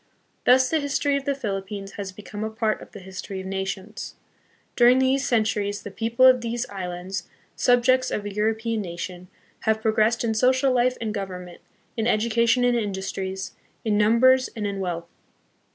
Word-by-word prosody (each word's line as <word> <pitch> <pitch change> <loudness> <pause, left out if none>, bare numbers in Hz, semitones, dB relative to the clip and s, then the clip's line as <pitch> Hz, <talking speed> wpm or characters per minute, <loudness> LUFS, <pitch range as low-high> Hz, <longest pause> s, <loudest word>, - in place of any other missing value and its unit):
Thus 255 +1 +6
the 320 +4 +1
history 285 0 0
of 280 -1 -2
the 280 - 0
Philippines 195 -4 -4
has 195 -1 -6
become 205 +2 -7
a 220 - -2
part 220 -1 -1
of - - -12
the - - -10
history 190 +1 -7
of 190 - -7
nations. 190 +3 -5 0.6
During 245 +1 +6
these 265 +1 +2
centuries 210 -3 0
the 205 - -7
people 230 +5 +2
of 255 -1 +7
these 235 +1 -3
islands, 185 0 -5 0.3
subjects 255 +1 +3
of 205 - -3
a 205 - -5
Euro 215 +2 +1
pean 225 0 -2
nation, 180 0 -6 0.3
have 220 0 +1
progressed 220 +1 +2
in 225 -1 +1
social 260 +4 +3
life 250 0 +2
and 220 -2 -3
govern 190 -3 -5
ment, 175 -1 -13 0.3
in 225 -1 0
education 235 +2 +2
and 245 0 +3
industries, 190 -3 -3 0.3
in 215 -2 +2
numbers, 240 +5 +4
and 215 -2 -3
in 200 -1 -3
wealth. 175 -3 -3
220 Hz, 175 wpm, -24 LUFS, 195-245 Hz, 0.6 s, of